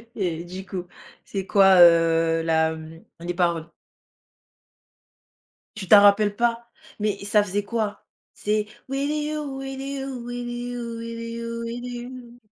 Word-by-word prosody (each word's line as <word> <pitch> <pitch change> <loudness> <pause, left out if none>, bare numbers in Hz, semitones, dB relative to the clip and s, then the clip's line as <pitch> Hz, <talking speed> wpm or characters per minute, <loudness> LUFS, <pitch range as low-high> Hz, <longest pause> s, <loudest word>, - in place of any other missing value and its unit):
Et 170 -5 -2
du 185 +2 -8
coup, 180 -2 -6 0.4
c'est 195 -1 -4
quoi, 195 -1 +6
heu, 165 -1 +5
la, 160 0 +2
mmh 160 +1 -11 0.2
les 175 +1 -3
paroles? 170 -2 0 2.1
Tu 195 -4 -6
t'en 210 - +9
rappelles 205 0 +5
pas? 235 0 0 0.3
Mais 210 -1 0
ça 205 +1 +4
faisait 205 +1 -2
quoi? 215 -1 -3 0.3
C'est. 210 0 -1 0.2
With 275 +2 -1
you, 300 -2 -3
with 270 0 -6
you, 270 -2 -5
with 245 0 -5
you, 240 -1 -5
with 230 0 -6
you, 230 0 -5
with 235 +1 -5
you. 245 0 -8
215 Hz, 140 wpm, -24 LUFS, 180-245 Hz, 2.1 s, t'en